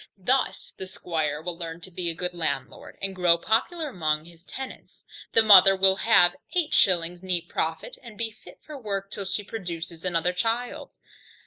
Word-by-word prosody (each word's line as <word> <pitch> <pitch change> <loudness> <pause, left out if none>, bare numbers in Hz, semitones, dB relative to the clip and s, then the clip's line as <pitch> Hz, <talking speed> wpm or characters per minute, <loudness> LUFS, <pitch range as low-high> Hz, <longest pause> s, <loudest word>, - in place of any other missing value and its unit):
Thus 255 +8 0
the 190 - -7
squire 160 -5 -2
will 175 0 -4
learn 165 -1 -7
to 185 - -10
be 175 0 -3
a 165 - -3
good 180 +2 -3
landlord, 170 -2 -4
and 195 -1 -3
grow 175 -2 +4
popular 300 - 0
among 155 - -1
his 170 -1 -17
tenants, 265 +7 -9 0.3
the 225 - +5
mother 195 -2 +8
will 190 0 +4
have 190 -7 +5 0.2
eight 335 -3 +1
shillings 175 -2 +3
neat 180 -3 -1
profit, 160 0 -3
and 230 -4 -12
be 230 -1 -2
fit - - -17
for 305 - -9
work 195 -3 -4
till 200 - -5
she 195 +2 -1
produces 170 -6 -6
another 180 -1 0
child. 230 +6 -2
185 Hz, 180 wpm, -25 LUFS, 170-215 Hz, 0.3 s, mother